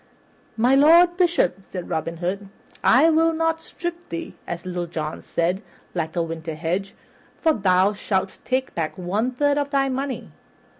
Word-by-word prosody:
"My 245 +4 +4
Lord 335 +5 +6
Bishop," 345 - +2
said 180 -2 -6
Robin 165 +1 -2
Hood, 190 +4 -3 0.4
"I 300 +7 +6
will 325 +1 +3
not 325 0 0
strip 345 0 -6
thee, 165 - -5
as 175 +1 -5
Little 175 -1 -3
John 155 -2 -4
said, 175 +3 -1 0.3
like 160 -2 -3
a 170 - +1
winter 165 -1 -5
hedge, 180 +6 -2 0.4
for 320 -2 +3
thou 190 -2 +3
shalt 195 -2 -2
take 260 0 -1
back 165 +2 -3
one 195 +7 -1
third 285 +3 +1
of 285 -1 -1
thy 275 -1 +1
money. 265 +1 -3
200 Hz, 160 wpm, -23 LUFS, 175-285 Hz, 0.4 s, Lord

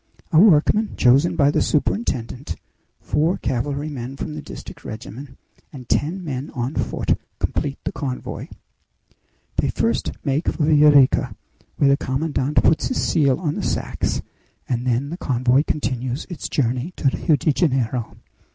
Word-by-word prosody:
A 160 - +6
workman 205 +3 +4
chosen 135 +7 +4
by 145 0 +4
the - - +1
superintendent, 140 - -1 0.5
four 160 +5 +1
cavalrymen 135 0 -3
from 155 - -5
the 150 - -6
district - - -10
regiment, 115 +5 -8 0.3
and 130 -4 -10
ten 180 +6 0
men 135 -4 -4
on 125 +3 -2
foot, - - -1 0.2
complete 140 -1 -2
the - - -2
convoy. 130 -3 -5 1.1
They - - +1
first - - 0
make 140 +4 0
for 150 - +1
Villa 150 -1 +6
Rica, 135 -2 +4 0.4
where 140 -1 +4
the 140 - +4
commandant 140 0 0
puts 155 - +3
his 260 - -2
seal 140 -4 +2
on 155 -5 -1
the - - -3
sacks, - - -2 0.4
and 125 0 -2
then 125 +4 0
the 170 - -4
convoy 130 -3 +2
continues 130 -1 -2
its 175 - -5
journey 130 +5 -1
to 135 - +1
Rio 160 - +2
de 145 +2 +1
Janeiro. 130 -7 0
140 Hz, 150 wpm, -22 LUFS, 130-155 Hz, 1.1 s, A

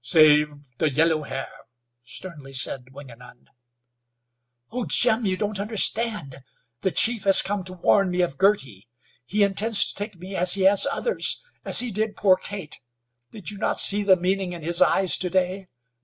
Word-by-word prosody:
"Save 150 +2 +4 0.2
the 155 - +1
yellow 160 +2 +1
hair," 135 -2 -7 0.5
sternly 140 +1 -8
said 130 0 -1
Wingenund. 125 -3 -15 1.2
"Oh, 245 0 -4
Jim, 220 +9 +2
you 185 -1 -1
don't 210 -1 -4
understand. 210 - -1 0.4
The - - +1
chief 225 +2 +1
has 195 -1 +5
come 200 -1 -3
to 185 - -8
warn 190 +2 +1
me 180 0 -1
of 170 -6 -3
Girty. 135 - 0 0.4
He 205 +5 +1
intends 200 +2 +3
to - - -1
take 205 0 -6
me 185 +3 -9
as 180 +1 +5
he 195 - -1
has 195 +1 +5
others, 475 - -1 0.2
as - - +3
he 245 -2 -5
did 215 +1 -3
poor 190 -2 +4
Kate. 190 -4 -8 0.5
did 210 -3 -7
you 205 - -10
not - - -1
see 205 +1 +3
the 195 -2 +4
meaning 185 0 -2
in 170 -2 -9
his 170 +2 -2
eyes 190 -2 +3
to 180 - 0
day? 185 +1 -2
185 Hz, 170 wpm, -23 LUFS, 150-205 Hz, 1.2 s, has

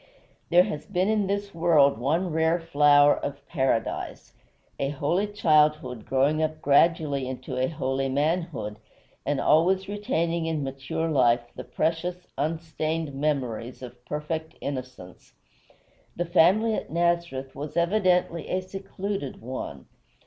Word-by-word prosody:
There 175 +1 +6
has 150 -4 -5
been 190 0 0
in 210 -3 +1
this 200 0 -2
world 155 -7 +4
one 165 +8 0
rare 160 +2 +2
flower 145 -3 +5
of 140 0 -6
Paradise, 130 -7 -2 0.5
a 135 - 0
holy 150 +8 0
childhood 150 - +2
growing 140 +4 +2
up 155 0 -1
gradually 145 -2 +2
into 130 0 -6
a 130 +1 +1
holy 135 -2 -2
manhood, 145 -6 -1 0.5
and 145 -2 +1
always 185 +5 +3
retaining 170 -6 -1
in 155 -3 -1
mature 135 +4 -3
life 120 -5 +3
the - - -6
precious, 175 +3 -2
unstained 160 0 -2
memories 130 -4 -2
of 125 -1 -11
perfect 155 +2 -4
innocence. 130 -10 -7 0.8
The 175 - -1
family 190 +6 +4
at - - -3
Nazareth 170 -6 -1
was 150 +3 -6
evidently 180 -1 +1
a 185 - 0
secluded 195 -4 -5
one. 115 - -6
155 Hz, 125 wpm, -26 LUFS, 135-175 Hz, 0.8 s, There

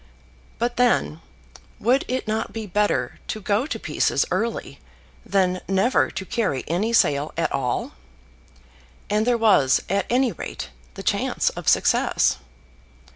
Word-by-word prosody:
But 240 +1 -1
then, 240 -10 +2 0.6
would 250 +6 +2
it 255 -2 -2
not 220 +1 -2
be 225 -1 -5
better 205 +2 0
to 215 - -3
go 215 +6 0
to - - -4
pieces - - +1
early 230 +1 -2 0.4
than 185 -2 +1
never 195 +7 +2
to 190 - -6
carry 195 - -1
any 190 +8 0
sail 145 -9 +2
at 165 - 0
all? 125 -3 -2 1.2
And 215 +2 +1
there 245 -1 +3
was, 195 - +4
at 195 0 0
any 250 0 +2
rate, 65 - -7 0.2
the - - -7
chance - - +1
of - - -9
success. - - +3
210 Hz, 135 wpm, -23 LUFS, 180-235 Hz, 1.2 s, was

